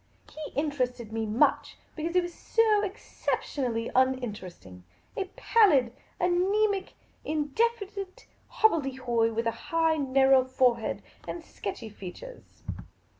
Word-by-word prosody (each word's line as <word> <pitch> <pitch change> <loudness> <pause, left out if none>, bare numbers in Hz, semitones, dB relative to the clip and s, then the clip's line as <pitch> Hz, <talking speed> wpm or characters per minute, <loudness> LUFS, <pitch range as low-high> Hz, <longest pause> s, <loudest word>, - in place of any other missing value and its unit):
He 310 -1 -7
interested 250 -6 -2
me 225 -1 -1
much 215 +3 +2
— - - -35
because 335 +2 -3
he 360 - +6
was 350 0 -6
so 435 0 +2
exception 385 - -3
ally 230 -1 -1
uninteresting; 210 - -1 0.3
a 395 - -1
pallid, 295 - +4 0.3
anaemic, 385 +3 +1 0.3
in 300 -1 -1
definite 405 0 -2 0.2
hobble 435 -8 +3
dehoy, 245 -4 0
with 230 +1 -2
a 230 - +2 0.2
high, 325 -1 +2
narrow 270 -1 +4
forehead, 250 -3 +1 0.2
and 340 - -5
sketchy 230 - -6
f 210 - -21
e 190 - -5
a - - -4
t - - -11
ures. - - -14
280 Hz, 140 wpm, -28 LUFS, 240-370 Hz, 0.3 s, he